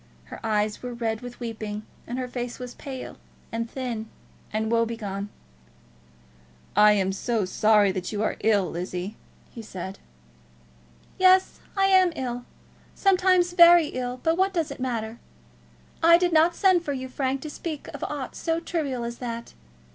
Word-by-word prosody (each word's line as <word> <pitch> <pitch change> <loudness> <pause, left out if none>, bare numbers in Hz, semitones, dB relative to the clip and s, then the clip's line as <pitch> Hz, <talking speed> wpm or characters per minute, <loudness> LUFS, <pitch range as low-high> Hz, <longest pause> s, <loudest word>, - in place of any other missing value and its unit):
Her - - -10
eyes 210 -1 0
were 245 -1 -5
red 225 -2 -2
with 245 -1 -9
weeping, 215 -3 -5 0.2
and 245 - -4
her 255 -1 -2
face 245 -1 -5
was 250 -1 -7
pale, 265 -2 -8 0.3
and 230 0 -3
thin, 235 -4 -4 0.4
and 220 +1 -1
woe 230 0 +4
begone. 205 -3 -4 1.5
"I 210 +1 +7
am 195 -2 +1
so 215 +1 -1
sorry 210 +1 +4
that 185 -1 -4
you 210 0 -1
are - - 0
ill, 205 -3 +2
Lizzie," 180 +4 -4 0.4
he 230 - -8
said. 190 -2 -7 1.2
"Yes, 370 0 +5 0.2
I 390 - +4
am 375 -2 +5
ill; 245 -3 -4 0.5
sometimes 370 -2 +3
very 345 -3 +7
ill; 250 0 -4
but 325 +1 +2
what 385 0 +2
does 330 -3 0
it - - -8
matter? 235 -3 -3 0.8
I 335 +1 +7
did 355 -1 +1
not 330 +2 +5
send 375 -4 +4
for 290 - -2
you, 260 -1 -4
Frank, 265 +1 -2
to 305 - -6
speak 310 -1 -6
of - - -7
aught 285 -4 -5
so 330 -1 -1
trivial 295 -7 -2
as 235 0 -5
that. 235 -2 -5
245 Hz, 160 wpm, -25 LUFS, 220-320 Hz, 1.5 s, I